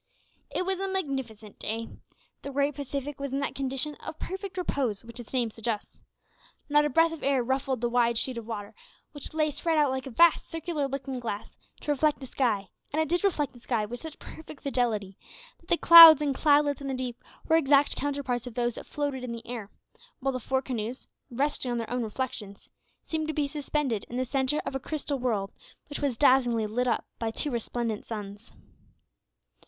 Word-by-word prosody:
It 365 Hz, -, -2 dB
was 380 Hz, 0 st, 0 dB
a 390 Hz, -, -1 dB
magnificent 265 Hz, -, -4 dB
day. 225 Hz, +1 st, -3 dB, 0.5 s
The -, -, -6 dB
great 280 Hz, +1 st, +1 dB
Pacific 280 Hz, 0 st, -5 dB
was 280 Hz, -1 st, -4 dB
in 275 Hz, -, 0 dB
that 280 Hz, -, -2 dB
condition 270 Hz, +2 st, -1 dB
of 315 Hz, -, -8 dB
perfect 380 Hz, +2 st, -6 dB
repose 255 Hz, -, -1 dB
which 235 Hz, +1 st, -8 dB
its 240 Hz, -, -10 dB
name 245 Hz, -4 st, 0 dB
suggests. 225 Hz, -1 st, -4 dB, 0.7 s
Not 295 Hz, 0 st, +4 dB
a -, -, +1 dB
breath 330 Hz, +4 st, +4 dB
of 325 Hz, -, -7 dB
air 275 Hz, -2 st, +2 dB
ruffled 265 Hz, 0 st, -1 dB
the 240 Hz, -, +2 dB
wide 235 Hz, -1 st, +2 dB
sheet 255 Hz, +2 st, +1 dB
of 225 Hz, -, -10 dB
water, 205 Hz, -3 st, -5 dB, 0.4 s
which 290 Hz, +1 st, -7 dB
lay 310 Hz, -1 st, +2 dB
spread 320 Hz, +3 st, 0 dB
out 295 Hz, -3 st, +4 dB
like 265 Hz, 0 st, -3 dB
a -, -, -5 dB
vast 335 Hz, +7 st, +4 dB
circular 325 Hz, -3 st, -2 dB
looking 270 Hz, -1 st, -4 dB
glass 220 Hz, -3 st, -5 dB, 0.3 s
to 295 Hz, -, -1 dB
reflect 295 Hz, +1 st, +2 dB
the 270 Hz, -, -7 dB
sky, 225 Hz, -7 st, 0 dB, 0.2 s
and 300 Hz, -, -1 dB
it 315 Hz, -, +1 dB
did 350 Hz, +3 st, +1 dB
reflect 300 Hz, -10 st, +1 dB
the 245 Hz, -, -14 dB
sky 235 Hz, -3 st, -1 dB
with 240 Hz, +3 st, -6 dB
such 320 Hz, +1 st, -8 dB
perfect 315 Hz, -2 st, -11 dB
fidelity, 225 Hz, -8 st, -1 dB, 0.4 s
that 335 Hz, -, -24 dB
the 345 Hz, -, +4 dB
clouds 330 Hz, -3 st, +11 dB
and 290 Hz, -2 st, 0 dB
cloudlets 290 Hz, 0 st, +3 dB
in 280 Hz, -, -5 dB
the 265 Hz, -, -1 dB
deep 250 Hz, -2 st, -5 dB, 0.2 s
were 320 Hz, -, +4 dB
exact 285 Hz, -2 st, +4 dB
counterparts 275 Hz, -4 st, -2 dB
of 240 Hz, -, -8 dB
those 240 Hz, -1 st, 0 dB
that -, -, -9 dB
floated 285 Hz, -3 st, -3 dB
in 250 Hz, -, -4 dB
the 230 Hz, 0 st, -7 dB
air, 230 Hz, -4 st, -6 dB, 0.5 s
while 270 Hz, +1 st, 0 dB
the 255 Hz, -, -2 dB
four 265 Hz, +2 st, -1 dB
canoes, 240 Hz, 0 st, -4 dB, 0.2 s
resting 270 Hz, +1 st, -1 dB
on 240 Hz, -, -1 dB
their 230 Hz, -1 st, -4 dB
own 250 Hz, 0 st, 0 dB
reflections, 215 Hz, -3 st, -5 dB, 0.3 s
seemed 315 Hz, -1 st, -2 dB
to 315 Hz, -, -3 dB
be 295 Hz, -2 st, +1 dB
suspended 285 Hz, -6 st, -1 dB
in 245 Hz, -, -6 dB
the 255 Hz, -, 0 dB
centre 270 Hz, +3 st, 0 dB
of -, -, -3 dB
a 270 Hz, -, -1 dB
crystal 285 Hz, -1 st, -2 dB
world, 215 Hz, -6 st, -1 dB, 0.4 s
which 290 Hz, -, -4 dB
was 275 Hz, -5 st, -1 dB
dazzlingly 245 Hz, -5 st, +4 dB
lit 245 Hz, +4 st, -1 dB
up 235 Hz, -, 0 dB
by 230 Hz, -, -1 dB
two 285 Hz, +6 st, -2 dB
resplendent 235 Hz, -2 st, -2 dB
suns. 205 Hz, -1 st, -8 dB
265 Hz, 205 wpm, -28 LUFS, 235-295 Hz, 0.7 s, clouds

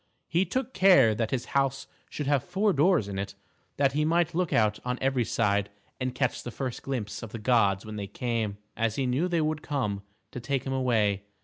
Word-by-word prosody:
He 175 Hz, +3 st, +2 dB
took 260 Hz, +3 st, -2 dB
care 180 Hz, -, +6 dB
that 110 Hz, 0 st, -1 dB
his 125 Hz, -2 st, -2 dB
house 135 Hz, -1 st, +1 dB, 0.2 s
should 150 Hz, -, -4 dB
have 140 Hz, -2 st, +2 dB
four 195 Hz, +3 st, +1 dB
doors 155 Hz, -, +3 dB
in 95 Hz, -1 st, -4 dB
it, 100 Hz, -, -5 dB, 0.4 s
that 140 Hz, -1 st, +3 dB
he 150 Hz, +2 st, 0 dB
might 170 Hz, +2 st, +2 dB
look 175 Hz, 0 st, 0 dB
out 105 Hz, -2 st, +2 dB
on 125 Hz, 0 st, -2 dB
every 130 Hz, -2 st, +1 dB
side 100 Hz, -3 st, +1 dB, 0.3 s
and 130 Hz, 0 st, -2 dB
catch 125 Hz, -1 st, 0 dB
the -, -, -6 dB
first 125 Hz, 0 st, -4 dB
glimpse 105 Hz, -6 st, -4 dB
of 115 Hz, -, -8 dB
the 115 Hz, -, -5 dB
gods 105 Hz, -4 st, +2 dB
when 110 Hz, 0 st, -6 dB
they 100 Hz, -1 st, -4 dB
came, 110 Hz, -1 st, -2 dB, 0.2 s
as 115 Hz, -1 st, 0 dB
he 135 Hz, -, 0 dB
knew 130 Hz, +8 st, +1 dB
they 170 Hz, -2 st, +1 dB
would 155 Hz, 0 st, -1 dB
come, 125 Hz, -10 st, -2 dB, 0.3 s
to -, -, -6 dB
take 130 Hz, +2 st, -2 dB
him 135 Hz, -, -3 dB
away. 110 Hz, -7 st, +1 dB
125 Hz, 215 wpm, -28 LUFS, 110-145 Hz, 0.4 s, care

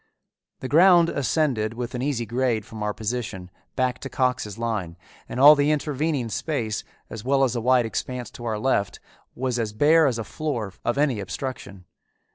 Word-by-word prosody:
The 130 Hz, -, -3 dB
ground 170 Hz, +3 st, +6 dB
ascended 130 Hz, -6 st, 0 dB
with 120 Hz, 0 st, -5 dB
an 125 Hz, -, -3 dB
easy 130 Hz, -4 st, -1 dB
grade 120 Hz, -3 st, -1 dB
from 110 Hz, -1 st, -9 dB
our 105 Hz, 0 st, 0 dB
position 105 Hz, -4 st, -4 dB, 0.2 s
back 125 Hz, -1 st, 0 dB
to 135 Hz, -, -7 dB
Cox's 125 Hz, -6 st, -1 dB
line, 105 Hz, -8 st, -3 dB, 0.3 s
and 125 Hz, -, -4 dB
all 145 Hz, +3 st, +10 dB
the 145 Hz, 0 st, +2 dB
intervening 150 Hz, -3 st, -1 dB
space, 110 Hz, -, -2 dB, 0.3 s
as 110 Hz, -2 st, -7 dB
well 135 Hz, +2 st, +2 dB
as 125 Hz, -2 st, +1 dB
a 120 Hz, -, -1 dB
wide 125 Hz, 0 st, +3 dB
expanse 125 Hz, +1 st, -4 dB
to 120 Hz, -, -10 dB
our 110 Hz, -2 st, -1 dB
left, 105 Hz, -4 st, 0 dB, 0.4 s
was 125 Hz, -1 st, -2 dB
as 110 Hz, -2 st, -2 dB
bare 155 Hz, +7 st, +5 dB
as 125 Hz, -4 st, 0 dB
a 115 Hz, -, -3 dB
floor 115 Hz, -9 st, -4 dB
of 120 Hz, -, -1 dB
any 140 Hz, -6 st, +1 dB
obstruction. 100 Hz, -1 st, -6 dB
125 Hz, 180 wpm, -24 LUFS, 110-140 Hz, 0.4 s, all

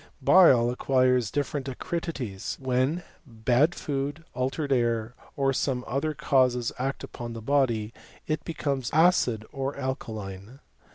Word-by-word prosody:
Bile 130 Hz, -6 st, +6 dB
acquires 125 Hz, -2 st, +2 dB
different 145 Hz, -1 st, -2 dB
acridities, 135 Hz, -, -4 dB
when 130 Hz, +6 st, 0 dB, 0.2 s
bad 125 Hz, +5 st, +1 dB
food, 145 Hz, +2 st, -3 dB
altered 135 Hz, +3 st, -2 dB
air, 120 Hz, -2 st, +1 dB, 0.2 s
or 135 Hz, -1 st, +1 dB
other -, -, +1 dB
similar 135 Hz, +3 st, -1 dB
causes 130 Hz, -4 st, +2 dB
act 135 Hz, +2 st, -2 dB
apon 120 Hz, -2 st, -7 dB
the -, -, -5 dB
body, 115 Hz, -3 st, +1 dB
i -, -, -19 dB, 0.3 s
It 155 Hz, -, -3 dB
becomes 140 Hz, -6 st, -2 dB
acid 150 Hz, -9 st, +3 dB
or 135 Hz, +1 st, -3 dB
alkaline. 110 Hz, -4 st, -5 dB
130 Hz, 125 wpm, -27 LUFS, 120-145 Hz, 0.3 s, Bile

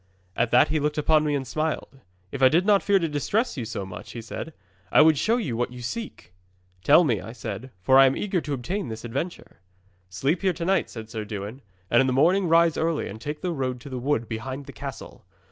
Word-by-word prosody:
'At 115 Hz, 0 st, +1 dB
that 120 Hz, -, +5 dB
he 155 Hz, 0 st, +1 dB
looked 150 Hz, +1 st, -1 dB
upon 155 Hz, +1 st, +3 dB
me 145 Hz, -1 st, +1 dB
and 135 Hz, -1 st, -2 dB
smiled. 155 Hz, +1 st, -3 dB, 0.3 s
'"If 140 Hz, -, -5 dB
I 130 Hz, -, +7 dB
did 170 Hz, +6 st, +2 dB
not 205 Hz, -1 st, +4 dB
fear 200 Hz, -1 st, +3 dB
to 170 Hz, -3 st, 0 dB
distress 180 Hz, -, -1 dB
you 125 Hz, -5 st, -4 dB
too 100 Hz, -3 st, -4 dB
much," 95 Hz, -1 st, -9 dB
he 115 Hz, -, -6 dB
said, 130 Hz, +7 st, -6 dB, 0.4 s
"I -, -, +5 dB
would 160 Hz, 0 st, +5 dB
show 225 Hz, -, +1 dB
you 145 Hz, -, -2 dB
what 120 Hz, +1 st, -1 dB
you 125 Hz, -1 st, -9 dB
seek!" 215 Hz, -, -6 dB, 0.5 s
'"Tell 150 Hz, +5 st, +6 dB
me," 120 Hz, -, 0 dB
I 115 Hz, -, -9 dB
said, 115 Hz, +1 st, -6 dB
"for 130 Hz, +6 st, +6 dB
I 135 Hz, -, +8 dB
am 130 Hz, -, 0 dB
eager 190 Hz, -4 st, -1 dB
to 145 Hz, -, -4 dB
obtain 175 Hz, +8 st, -3 dB
this 110 Hz, 0 st, -7 dB
adventure." 140 Hz, -, -5 dB, 0.5 s
'"Sleep 135 Hz, -, -1 dB
here 190 Hz, -2 st, +2 dB
to 170 Hz, 0 st, -5 dB
night," 190 Hz, +2 st, +1 dB
said 110 Hz, -1 st, -9 dB
Sir 110 Hz, -, -4 dB
Dewin, 105 Hz, +4 st, -6 dB, 0.3 s
"and 120 Hz, -, +6 dB
in 135 Hz, -, +2 dB
the 130 Hz, -, +1 dB
morning 175 Hz, +8 st, +3 dB
rise 165 Hz, 0 st, +4 dB
early, 160 Hz, -1 st, 0 dB
and 110 Hz, +2 st, -9 dB
take 150 Hz, +5 st, -5 dB
the 180 Hz, -, -1 dB
road 130 Hz, -5 st, -2 dB
to 140 Hz, -, -10 dB
the 130 Hz, -1 st, -4 dB
wood 120 Hz, -3 st, 0 dB
behind 130 Hz, +5 st, -5 dB
the -, -, -10 dB
castle. -, -, -8 dB
140 Hz, 240 wpm, -25 LUFS, 120-165 Hz, 0.5 s, I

